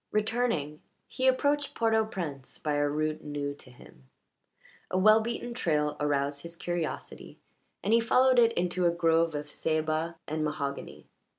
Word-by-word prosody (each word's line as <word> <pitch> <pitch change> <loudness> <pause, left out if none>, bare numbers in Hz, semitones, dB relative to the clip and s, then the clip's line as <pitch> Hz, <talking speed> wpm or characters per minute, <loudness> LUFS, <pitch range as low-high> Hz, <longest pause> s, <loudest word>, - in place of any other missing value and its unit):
Returning, 215 -9 -1 0.3
he 260 - -1
approached 285 +2 +2
Port 225 -1 +1
au 220 -1 +3
Prince 150 -10 -6
by 150 - -2
a 145 0 +1
route 155 +1 -2
new 145 -1 -3
to 140 - -16
him. 95 - -17 0.8
A 185 - -1
well 215 +3 +6
beaten 235 +1 -4
trail 150 -9 0
aroused 140 -1 0
his 170 +2 -8
curiosity 175 -2 -5 0.5
and 210 - +1
he 230 - +6
followed 255 +2 +4
it 230 -1 +5
into 180 0 +1
a - - +3
grove 165 -1 +2
of 145 0 -3
ceiba 155 +2 -1
and 155 0 -2
mahogany. 140 -2 -4
165 Hz, 160 wpm, -29 LUFS, 150-220 Hz, 0.8 s, well